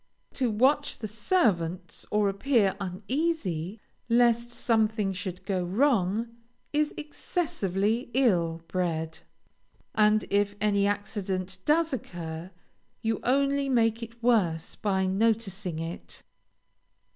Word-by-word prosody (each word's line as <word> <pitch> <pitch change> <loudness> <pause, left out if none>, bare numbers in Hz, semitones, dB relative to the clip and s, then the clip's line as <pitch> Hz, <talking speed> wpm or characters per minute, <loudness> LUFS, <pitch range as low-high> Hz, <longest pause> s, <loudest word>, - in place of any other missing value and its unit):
To 255 -3 +1
watch 265 +7 +2
the 220 - -5
servants, 195 - 0
or 210 -1 +2
appear 200 0 +2
uneasy, 200 - -2 0.3
lest 235 0 +3
something 220 -4 +1
should 185 -2 -6
go 190 -3 0
wrong, 225 +1 +1 0.4
is 300 0 +2
excessively 235 - -1
ill 170 -10 +2
bred, 160 -3 -2 0.7
and 215 0 +4
if 205 0 +2
any 200 -1 +2
accident 190 -2 -2
does 320 0 +3
occur, 170 -7 -5 0.5
you 225 -1 0
only 275 +2 +2
make 230 -2 +2
it 230 0 -9
worse 185 -10 +2
by 190 -2 0
noticing 195 -3 0
it. 165 +2 -7
210 Hz, 105 wpm, -28 LUFS, 185-240 Hz, 0.7 s, and